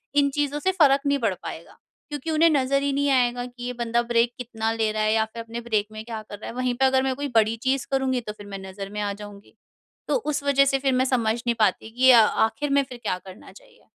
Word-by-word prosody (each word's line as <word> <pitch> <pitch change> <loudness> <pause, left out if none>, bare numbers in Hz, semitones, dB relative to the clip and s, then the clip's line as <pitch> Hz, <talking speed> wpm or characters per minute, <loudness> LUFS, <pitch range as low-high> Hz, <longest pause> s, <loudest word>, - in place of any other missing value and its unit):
इन 285 -1 +4
चीज़ों 290 0 0
से 375 +5 +1
फ़र्क 285 -7 +4
नहीं 280 0 +2
पड़ - - 0
पाएगा। - - -8 0.3
क्योंकि 295 +2 -4
उन्हें 325 +2 +4
नज़र 275 -1 +2
ही 280 - +1
नहीं 285 +1 +1
आएगा 245 -1 +1
कि 245 0 -11
ये 250 0 -3
बंदा 235 0 0
ब्रेक 235 +1 +3
कितना 225 -2 -3
ले 220 -1 0
रहा 215 0 -1
है 215 0 +2
या 220 0 +2
फिर 230 +1 -9
अपने 230 +1 -7
ब्रेक 215 -3 -1
में 215 0 -7
क्या 225 -2 -6
कर 205 - -7
रहा - - -7
है? 235 - -8
वहीं 255 -1 0
पे 265 +2 +2
अगर 265 0 +3
मैं 265 -1 0
कोई 285 +2 -3
बड़ी 220 0 +4
चीज़ 265 -1 0
करूँगी 265 -2 0
तो 210 -2 -7
फिर 205 -1 -12
मैं 195 -1 -7
नज़र 195 +1 -7
में 210 +1 -5
आ 205 -1 -1
जाऊँगी। 205 0 -12 0.5
तो - - +1
उस 300 - -3
वज़ह 275 -1 +4
से 270 0 +1
फिर 270 -1 +1
मैं 255 +1 +2
समझ 235 -4 +1
नहीं 235 - +2
पाती 215 +1 +1
कि 260 0 +7
अ, 235 - +8
आखिर 225 +8 0
में 280 0 +3
फिर 255 -2 -10
क्या 180 - -1
करना 190 +1 -12
चाहिए? - - -19
245 Hz, 265 wpm, -24 LUFS, 220-275 Hz, 0.5 s, अ